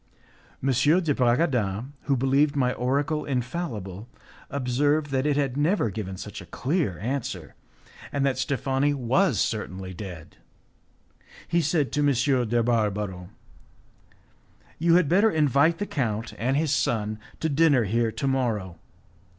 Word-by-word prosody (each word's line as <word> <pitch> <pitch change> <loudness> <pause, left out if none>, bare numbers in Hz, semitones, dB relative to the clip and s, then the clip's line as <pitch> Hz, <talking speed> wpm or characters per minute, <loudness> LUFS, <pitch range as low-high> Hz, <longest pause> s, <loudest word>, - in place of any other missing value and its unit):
M. 135 - +1
de 150 +5 +3
Bragadin, 125 - +1
who 140 -2 +2
believed 140 +3 +2
my 125 -3 +1
oracle 140 +5 0
infallible, 125 - -4 0.4
observed 145 +3 0
that 135 +1 +1
it 145 -1 +1
had 135 -3 0
never 145 - +1
given 95 -2 -5
such - - -8
a - - -12
clear 140 - -1
answer, 110 - -4 0.6
and 140 -1 0
that 130 -2 0
Steffani 135 +1 0
was 135 - +2
certainly 95 -5 -3
dead. 85 - -9 1.1
He 170 - +2
said 155 -2 0
to - - -1
M. 135 -3 +2
de 120 0 +2
Barbaro, 105 -6 -1 1.5
"You 170 +1 +4
had 180 -4 +4
better 200 +8 +4
invite 155 - +3
the 205 - -2
count 115 - -2
and 130 +4 +1
his 150 -1 +1
son 110 -5 0 0.2
to 160 - 0
dinner 145 -4 +4
here 115 +2 0
to 140 - -4
morrow. 110 -10 -1
130 Hz, 135 wpm, -25 LUFS, 110-145 Hz, 1.5 s, You